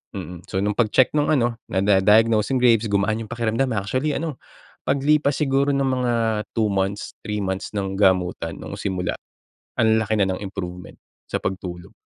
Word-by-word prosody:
mm, 90 -2 -7
so 95 - 0
nung 105 0 0
pag-check 120 +3 +3
nung 145 -1 +2
ano, 120 -5 +2 0.2
nada 95 +1 +3
diagnose 110 +2 +4
yung - - +2
Graves', 115 -3 +4
gumaan 110 +3 +1
yung 110 - -12
pakiramdam. 115 +3 0
Actually, 130 +9 -1
ano 160 -4 -3 0.5
paglipas 140 +1 +2
siguro 140 -1 +2
ng 140 - +1
mga 125 -2 0 0.4
2 110 -2 +2
months, 100 +1 -2
3 105 -1 -3
months, 95 0 -3
ng 95 -1 -2
gamutan. 95 -3 +2
No'ng - - -7
simula, 95 -3 -2 0.7
ang 110 -1 +4
laki 110 0 -1
na 100 - +3
ng 90 - -7
improvement 90 -3 -7 0.3
sa - - -2
pagtulog. 90 -2 -5
105 Hz, 170 wpm, -23 LUFS, 95-125 Hz, 0.7 s, diagnose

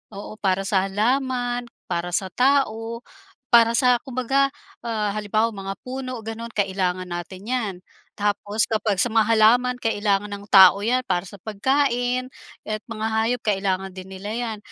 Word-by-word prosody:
Oo, 205 +2 -9
para 195 -1 +1
sa 195 -1 +1
halaman, 245 +3 0 0.2
para 175 0 -1
sa 190 -2 -2
tao, 235 -3 +1 0.5
para 230 -1 +6
sa 250 0 +4
kumbaga, 265 +2 +1 0.3
ah, 220 -3 -2
halimbawa 215 +2 0
mga 195 -2 -5
puno 255 -2 -5
gano'n 225 +1 -7
kailangan 185 -2 -1
natin 185 +5 -6
'yan. 225 -7 -1 0.4
Tapos 205 +1 -1
kapag 210 -3 0
sa 245 - +2
mga 220 -1 +3
halaman 230 +3 +4
kailangan 205 -2 0
ng 200 0 -7
tao 195 +1 +8
'yan 250 +2 +2
para 180 0 0
sa 195 0 -12
pagkain, 250 +3 0 0.3
at 215 - -3
mga 220 -2 -5
hayop 225 +2 0
kailangan 195 -2 -1
din 185 0 -10
nila 190 +2 -7
'yan. 225 0 -3
220 Hz, 150 wpm, -23 LUFS, 195-245 Hz, 0.5 s, tao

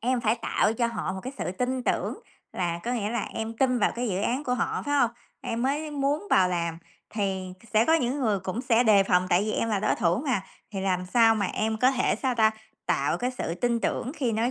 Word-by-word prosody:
em 250 +1 +1
phải 220 -1 +2
tạo 225 -2 +1
cho 235 +1 +1
họ 230 -5 -3
một 190 - -5
cái 260 - -5
sự 180 - -2
tin 250 +5 -2
tưởng - - 0 0.4
là 170 -1 -1
có 240 - -1
nghĩa 215 -3 -1
là 235 -3 -1
em 225 0 -4
tin 255 -1 +2
vào - - +2
cái 240 0 -2
dự 190 -1 -1
án 255 +7 -1
của 250 - 0
họ, - - -1
phải 290 - -1
hông? 245 -5 +3 0.3
Em 230 +1 -3
mới 295 +4 -1
muốn 290 +6 -1
vào 185 -1 +5
làm 170 -2 -2 0.3
thì 190 -3 -2 0.2
sẽ 220 - +5
có 320 - +4
những 275 -2 0
người 215 -5 +1
cũng 190 +6 -3
sẽ 240 -2 +3
đề 205 -3 +6
phòng 185 -1 +2
tại 180 +3 +4
vì 215 - -1
em 230 - 0
là 210 -3 0
đối - - +2
thủ 175 -3 +1
mà, 230 -8 +1 0.3
thì 195 - -4
làm 185 -1 -1
sao 225 +3 +5
mà 205 -3 0
em 220 +3 -1
có 255 +4 +4
thể 255 -2 +1
sao 260 -2 +1
ta? 220 -2 +4 0.4
Tạo - - +1
cái 250 +1 -1
sự 210 -10 -4
tin 235 +5 0
tưởng 250 - -2
khi 255 -7 -1
nói 225 +3 +1
225 Hz, 250 wpm, -26 LUFS, 195-250 Hz, 0.4 s, đề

